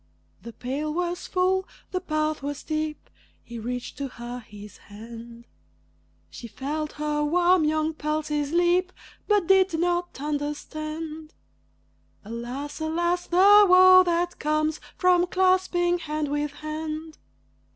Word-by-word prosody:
The 235 - -9
pail 280 +6 -3
was 350 +2 -3
full, 375 +1 +1 0.2
the 365 - -2
path 310 -3 -1
was 285 0 -4
steep 310 0 -4 0.4
He 235 -1 -8
reached 245 +4 -5
to 280 - -2
her 240 -1 -8
his 210 -3 -12
hand; 230 +2 -12 0.9
She 235 - -9
felt 300 +6 -4
her 300 0 -1
warm 350 +2 +3
young 310 +1 0
pulses 300 -1 -2
leap, 350 +2 +2 0.4
But 415 -4 +3
did 380 -2 +4
not 350 -2 -1
understand. 305 +2 -5 0.9
Alas! 245 +7 -6
alas! 345 +3 -1
the 405 +3 +7
woe 370 0 +8
that 350 0 -1
comes 305 +1 0 0.2
from 360 -1 +3
clasping 370 -1 +2
hand 305 -2 -3
with 295 0 -1
hand. 310 +1 -6
310 Hz, 120 wpm, -25 LUFS, 290-350 Hz, 0.9 s, woe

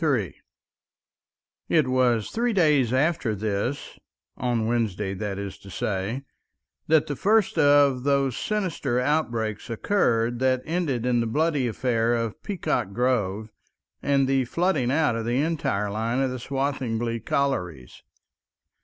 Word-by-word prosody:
§ - - -3
3 125 - +1 1.4
It 155 -5 +3
was 125 -4 +1
three 235 +1 0
days 150 - +3
after 130 -4 +1
this—on 110 +2 -4
Wednesday, 105 -4 -1
that 100 0 -4
is 100 -1 -6
to 100 - -13
say—that 120 - -3
the 145 - -4
first 210 - +2
of 145 -3 +5
those 140 -2 +1
sinister 185 - -1
outbreaks 120 -6 -1
occurred 120 - +1
that 130 -1 +1
ended 155 -8 -1
in 125 -1 +2
the 115 - 0
bloody 150 +1 +1
affair 120 0 0
of 115 -2 -3
Peacock 175 - -2
Grove 110 -3 0 0.5
and 140 -1 +2
the 135 -1 +2
flooding 155 -3 0
out 145 -3 +2
of 115 - -2
the 120 +2 0
entire 140 -10 -1
line 115 +4 -1
of 135 -1 +1
the 130 - -5
Swathinglea 120 -4 -2
collieries. 90 - -2
125 Hz, 130 wpm, -25 LUFS, 115-145 Hz, 1.4 s, of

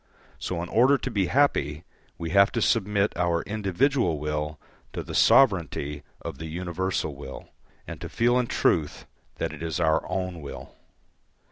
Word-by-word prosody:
So, 85 -2 -3
in 85 - -7
order 130 +5 +5
to 130 - -4
be 100 -5 +1
happy, 85 - +1 0.3
we 85 -1 -4
have 100 0 +5
to 115 - 0
submit 105 -2 +1
our 85 -1 +1
individual 105 - +1
will 75 0 -3 0.3
to - - -4
the - - -8
sovereignty 85 - +3 0.2
of - - -6
the 80 - -5
universal 85 -1 -2
will, 70 -1 -9 0.4
and - - -8
to - - -6
feel 120 +2 +2
in 125 - 0
truth 75 -8 0 0.3
that - - -3
it 75 - -10
is 85 0 -3
our 80 -1 +2
own 90 -2 -3
will. 70 - -9
90 Hz, 160 wpm, -26 LUFS, 80-105 Hz, 0.4 s, order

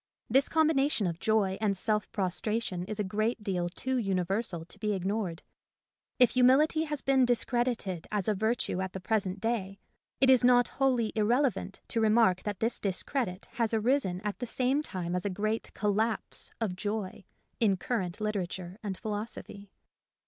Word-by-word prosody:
This 270 +3 +4
combination 300 -7 +2
of 170 -2 -2
joy 205 -3 +1
and 200 -3 +1
self 210 0 0
prostration 190 0 -1
is 215 +1 -6
a - - +2
great 215 +3 -1
deal 180 -4 -1
too 260 +8 -2
universal 190 -3 -1
to - - -9
be 210 -1 0
ignored. 190 -2 -2 0.7
If 250 -3 +6
humility 280 +6 +4
has 295 -2 -4
been 270 -1 +4
discredited 240 -7 0
as 205 -3 -1
a 215 - +3
virtue 220 -2 0
at 185 -1 -4
the 190 - -4
present 195 -1 -1
day, 195 -3 -2 0.4
it 265 - +5
is 260 -2 +6
not 245 0 +5
wholly 250 -5 +2
irrelevant 240 +5 +1
to 230 - 0
remark 215 -4 +4
that 205 -3 -4
this 230 +1 0
discredit 200 0 -2
has 230 -1 0
arisen 220 -5 +1
at 210 -1 -4
the 245 - -3
same 260 +5 +1
time 180 - -4
as 180 - -1
a 205 - 0
great 215 +4 -2
collapse 215 +2 -1
of 210 -6 -1
joy 205 -1 -4 0.4
in 205 -5 +3
current 185 -4 -2
literature 190 -3 -3
and 200 -4 -4
philosophy. 205 -1 -6
215 Hz, 165 wpm, -30 LUFS, 190-240 Hz, 0.7 s, If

